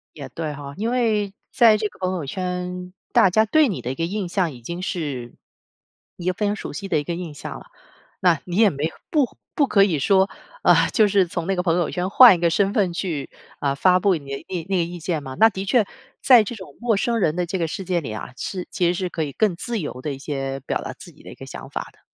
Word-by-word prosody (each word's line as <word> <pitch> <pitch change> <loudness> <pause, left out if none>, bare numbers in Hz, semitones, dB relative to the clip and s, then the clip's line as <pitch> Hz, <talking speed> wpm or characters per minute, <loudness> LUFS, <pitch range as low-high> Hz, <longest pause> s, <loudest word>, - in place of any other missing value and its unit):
也 140 -3 -7
对 155 +3 -4
哈。 140 -1 -8
因 220 +3 -1
为 215 -5 +1 0.2
在 225 -3 +6
这 210 0 -1
个 - - -22
朋 185 0 -1
友 165 -5 -4
圈， 180 +2 -4 0.2
大 190 - +5
家 220 +4 +3
对 310 +6 +4
你 200 - -3
的 125 - -3
一 - - -5
个 165 - -1
印 195 +2 -3
象 175 -3 0
已 120 - -13
经 170 +9 -6
是 145 -10 -4 0.8
一 175 - -8
个 185 - +2
非 210 +3 -2
常 205 - 0
熟 - - -6
悉 200 - -5
的 - - +1
一 - - -3
个 170 - -3
印 170 -3 -6
象 145 - -7
了。 - - -15 0.6
那 175 -5 +3
你 175 - -5
也 220 -1 +6
没 145 -3 -3
有 160 - -4 0.2
不 290 -5 +1 0.2
不 285 - +2
可 200 -5 +5
以 175 -7 +1
说 190 +6 +3 0.3
呃， - - +5
就 215 -2 +4
是 195 -2 +3
从 170 0 -4
那 195 - +1
个 180 - 0
朋 170 -2 +2
友 175 -3 0
圈 180 +1 -2
换 240 +2 +9
一 - - -5
个 170 0 +3
身 195 +4 +1
份 200 -6 +2
去， 165 -6 -3 0.3
啊， 140 -1 0
发 180 +5 +4
布 190 0 +3
你 150 -4 -7
的 140 - -6
那 180 -3 -3
那 195 - +1
个 175 - +2
意 175 +1 -6
见 165 -2 -2
嘛。 135 -1 -7
那 225 - +7
的 190 -3 -5
确， 220 +2 +3 0.4
在 245 -4 +7
这 225 +3 -6
种 190 -4 -11
陌 235 -2 +1
生 230 +3 0
人 160 -6 +1
的 180 0 0
这 185 +2 -3
个 165 - 0
世 190 - -5
界 180 -1 +1
里 135 - -6
啊， 110 - -6
是 185 +5 -5
其 175 - +1
实 175 - +2
是 180 0 -2
可 165 - -2
以 145 - -4
更 210 +1 +1
自 235 +5 -3
由 145 -6 -5
的 145 +1 -3
一 - - -7
些 135 -1 -4
表 135 - -2
达 - - -6
自 - - -13
己 - - -20
的 - - -11
一 - - -11
个 - - -10
想 - - -9
法 - - -5
的。 - - -29
180 Hz, 295 characters per minute, -22 LUFS, 160-200 Hz, 0.8 s, 换